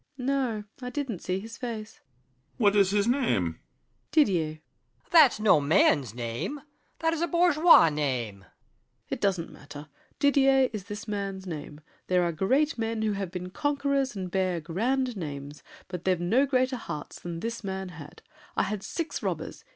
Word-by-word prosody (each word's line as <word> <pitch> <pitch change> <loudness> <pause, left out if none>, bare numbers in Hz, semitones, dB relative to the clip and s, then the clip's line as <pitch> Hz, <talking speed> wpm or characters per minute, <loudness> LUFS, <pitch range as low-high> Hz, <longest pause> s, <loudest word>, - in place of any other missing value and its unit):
SAVERNY. 250 -1 -4
No; 240 -6 -1 0.2
I 250 - -4
didn't 260 - -3
see 185 +1 -2
his 225 +3 -10
face. 225 -3 -6
BRICHANTEAU. 125 0 -41
What 210 -4 +3
is 200 -2 +5
his 205 +1 +1
name? 260 +4 +2
SAVERNY. 90 - 0 0.5
Didier. 195 - +3 0.6
ROCHEBARON. - - -32
That's 310 -10 +7
no 210 -8 +5
man's 140 - +3
name! 120 - -4 0.4
That 325 0 +1
is 330 - -3
a 340 - +2
bourgeois 340 - +6
name. 130 -9 -2
SAVERNY. 95 - -20 0.7
It - - -3
doesn't 185 -4 0
matter. 145 +1 -11 0.3
Didier 270 -2 +4
is 205 -4 -5
this 205 +2 -7
man's 195 -2 -4
name. 150 -3 -7 0.3
There 180 -1 +3
are 170 - +1
great 260 - +1
men 225 -1 -1
Who 215 - +1
have 195 -2 -3
been 180 0 -6
conquerors 280 -1 0
and 185 -2 -5
bear 185 -2 0
grand 240 - -1
names, 145 -4 -6 0.3
But 180 -2 -7
they've 185 -2 +2
no 230 +11 +2
greater 255 -1 +1
hearts 150 -10 -7
than 170 -1 -5
this 230 0 -4
man 190 -1 -4
had. 150 -4 -12 0.3
I - - +2
had 210 -1 -3
six 330 - -4
robbers! - - -4
200 Hz, 175 wpm, -28 LUFS, 165-255 Hz, 0.7 s, That's